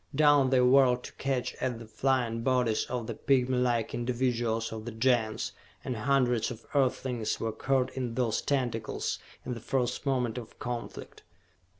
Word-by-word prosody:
Down 145 -2 +5
they 130 -1 +4
whirled 125 -1 +5
to - - -9
catch 135 -2 -2
at 125 -3 -1
the 115 - -9
flying 115 0 0
bodies 125 -3 +1
of 125 -2 -3
the 115 - -4
pigmylike 125 -1 +1
individuals 120 -2 -1
of 110 0 -6
the 120 - -4
Gens, 115 -1 +1 0.3
and 125 - -2
hundreds 125 0 +2
of 120 -2 -9
Earthlings 130 -4 0
were 115 - -1
caught 130 +3 0
in 125 -3 -4
those 120 -4 +1
tentacles 120 -5 -1 0.3
in 125 - -2
the 120 - -6
first 125 +1 -1
moment 125 -3 0
of 115 - -12
conflict. 120 -1 -6
125 Hz, 160 wpm, -29 LUFS, 115-130 Hz, 0.3 s, Down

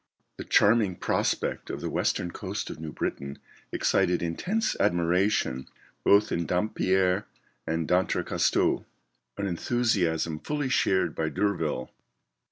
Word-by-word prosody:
The - - -7
charming 105 -3 +4
prospect - - -1
of - - -4
the - - -3
western 90 - 0
coast 100 +1 -5
of 75 - -9
New 80 -1 -6
Britain 70 -1 -4 0.3
excited 90 -1 +1
intense 190 - -1
admiration 85 -6 +1 0.4
both 100 +1 +4
in 85 -1 -1
Dampier 95 0 +1 0.4
and 80 -1 -1
D'Entrecasteaux; 90 +1 +1 0.5
an 100 - -2
enthusiasm 90 -6 0
fully 145 - -2
shared 95 -9 +2
by 80 -1 -1
D'Urville. 80 -6 -1
90 Hz, 115 wpm, -27 LUFS, 80-100 Hz, 0.5 s, charming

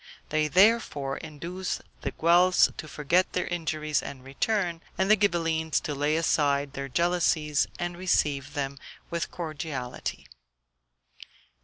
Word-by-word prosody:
They 155 0 +1
therefore 180 -7 +3
induced 170 +4 -5 0.2
the - - -2
Guelphs 175 +2 +4
to 155 - -7
forget 160 +5 +1
their 180 - 0
injuries 155 -3 -1
and 135 -2 -8
return, 170 +5 -1 0.2
and 190 +2 +2
the - - +9
Ghibellines 165 -5 +1
to 150 - -2
lay 145 +2 +1
aside 145 -3 +1
their 140 0 -5
jealousies 165 -2 +2
and 175 0 -3
receive 150 -5 0
them 140 -1 -3 0.3
with 170 -2 -2
cordiality. 155 -6 -5
160 Hz, 125 wpm, -27 LUFS, 145-175 Hz, 0.3 s, the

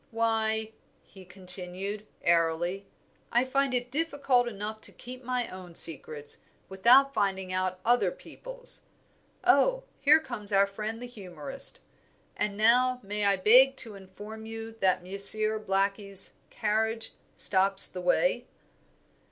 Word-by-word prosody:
Why," 220 -1 0 0.3
he 190 -2 -16
continued, 185 +3 -3 0.2
airily, 170 +3 0 0.4
"I 240 +2 +2
find 275 +1 0
it 245 0 -2
difficult 280 -5 +1
enough 215 0 -6
to - - -7
keep 255 +1 -11
my 250 0 -2
own 180 -2 -11
secrets, 150 -2 +1 0.3
without 250 +9 +4
finding 190 -3 -2
out 185 0 -2
other 245 +1 +3
people's. - - -8 0.6
Oh, 375 - +3 0.2
here 300 +2 +5
comes 210 -9 -2
our 195 0 +4
friend 215 +4 -6
the - - -4
humourist. 240 - -4 0.5
And 205 -1 -3
now 250 +3 +3
may 205 +1 -2
I 200 0 +3
beg 250 +8 +5
to 230 -5 +2
inform 205 +3 -11
you 225 0 -7
that 185 -2 +1
Monsieur 215 +3 +4
Blackie's 195 -1 -2
carriage 220 +1 -2 0.2
stops 195 0 +4
the 180 - -8
way." - - 0
215 Hz, 125 wpm, -28 LUFS, 190-245 Hz, 0.6 s, here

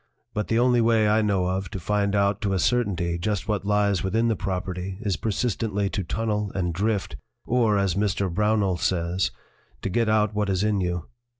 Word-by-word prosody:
But 105 - -2
the 115 - +1
only 120 0 +4
way 115 -2 +3
I 105 +1 +3
know 100 -4 +1
of 95 +1 -2
to 95 - -5
find 100 +2 0
out 100 0 +2
to 100 -3 0
a 95 - +1
certainty 90 -7 0
just 100 -1 -2
what 105 -3 -1
lies 105 -2 +2
within 115 +5 +1
the 110 - +1
property 95 -1 -4
is 100 -5 0
persistently 105 -1 -1
to 100 - -2
tunnel 105 +1 -2
and 90 -3 -1
drift, 100 -5 -1 0.3
or, 115 -4 +2
as 100 -3 +1
Mr. 100 0 0
Brownell 100 0 +1
says, 90 +1 0 0.5
'to - - -1
get 115 +3 +1
out 110 -1 +2
what 105 -1 0
is 95 0 +1
in 105 -2 +1
you.' 90 -1 -2
100 Hz, 195 wpm, -25 LUFS, 95-110 Hz, 0.5 s, only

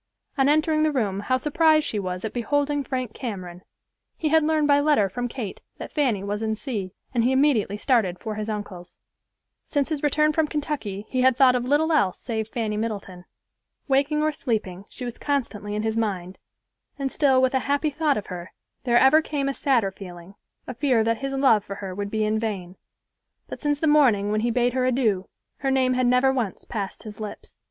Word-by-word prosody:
On 275 -2 +3
entering 310 +1 +2
the 310 0 +3
room 210 -8 -1
how 255 +6 0
surprised 310 +2 +3
she 210 - -2
was 185 0 -4
at 220 - -4
beholding 285 +4 0
Frank 255 -5 -3
Cameron. 185 -7 -6 0.6
He 310 - -1
had 320 +1 +5
learned 310 -1 +2
by 285 -1 +5
letter 285 -9 +3
from 245 +5 -3
Kate 230 -5 -6 0.2
that - - -8
Fanny 250 -10 +1
was 205 +1 -3
in 220 -1 -1
C——, 210 -6 -5 0.2
and 235 -2 +2
he 250 - +3
immediately 260 -7 +2
started 210 -6 +1
for 220 - -5
his 215 +1 -4
uncle's. 205 -4 -6 0.7
Since 285 -1 0
his 305 -3 -2
return 305 +1 +2
from 315 0 +1
Kentucky 285 -10 -4
he 255 - 0
had 260 -1 +4
thoughts 260 -2 +6
of 245 -1 -1
little 295 +5 +2
else 200 - +2
save 220 -3 -3
Fanny 220 -2 -3
Middleton. 200 -5 -5 0.6
Waking 285 +2 +2
or 310 - +2
sleeping, 210 -9 -3
she 250 - -7
was 240 -1 -7
constantly 230 -8 -2
in 210 - -2
his 220 0 -1
mind, 190 -5 -2 0.6
and 275 -2 -2
still 270 -3 +3
with 260 0 +2
a 265 - +3
happy 285 +2 +1
thought 300 0 +1
of 210 - -4
her 180 -1 -8 0.3
there 240 -1 +4
ever 265 +5 +6
came 290 -3 -2
a 275 - 0
sadder 240 -9 +1
feeling, 180 -1 -11 0.3
a - - -6
fear 250 -3 +2
that 230 0 0
his 275 0 -3
love 265 -7 +4
for 200 - -7
her 195 -2 -6
would 200 +1 -4
be 215 0 0
in 215 +1 0
vain. 195 -5 -4 0.7
But - - -8
since 290 -1 +1
the 320 - 0
morning 250 -10 +4
when 215 0 +1
he 240 - +1
bade 245 +1 +1
her 255 0 0
adieu, 235 -7 +1 0.3
her 270 - -1
name 260 -1 +2
had 255 -1 +1
never 250 +2 +4
once 235 -8 -3
passed 200 -4 -5
his 210 -1 -9
lips. 215 -1 -8
245 Hz, 210 wpm, -24 LUFS, 210-280 Hz, 0.7 s, thoughts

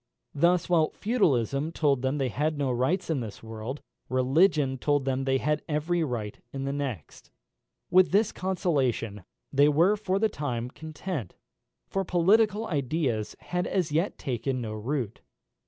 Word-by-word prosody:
Thus, 170 +4 +3
while 165 -3 +3
Feudalism 150 - +1
told 140 -6 +1
them 130 +2 0
they 135 -3 0
had 150 +5 -1
no 140 -3 0
rights 160 +9 0
in 150 - 0
this 110 -3 -7
world, 115 +5 -6 0.3
Religion 135 +1 +3
told 145 -1 +1
them 135 0 0
they 135 0 +2
had 150 +2 0
every 160 +3 0
right 115 -7 -4
in 135 -1 -4
the 140 - -1
next. 135 - -5 0.6
With 185 0 +6
this 205 +3 +3
consolation 135 - -1 0.3
they 145 +2 +5
were 170 +8 +4
for 200 -2 -1
the 220 +2 +3
time 125 - -3
content, 155 - -6 0.5
for 195 - -2
political 205 +5 +3
ideas 140 - -1
had 180 0 -2
as 180 -5 0
yet 165 +6 0
taken 130 -1 -2
no 110 -3 -4
root. 115 +1 -3
145 Hz, 155 wpm, -27 LUFS, 130-175 Hz, 0.6 s, With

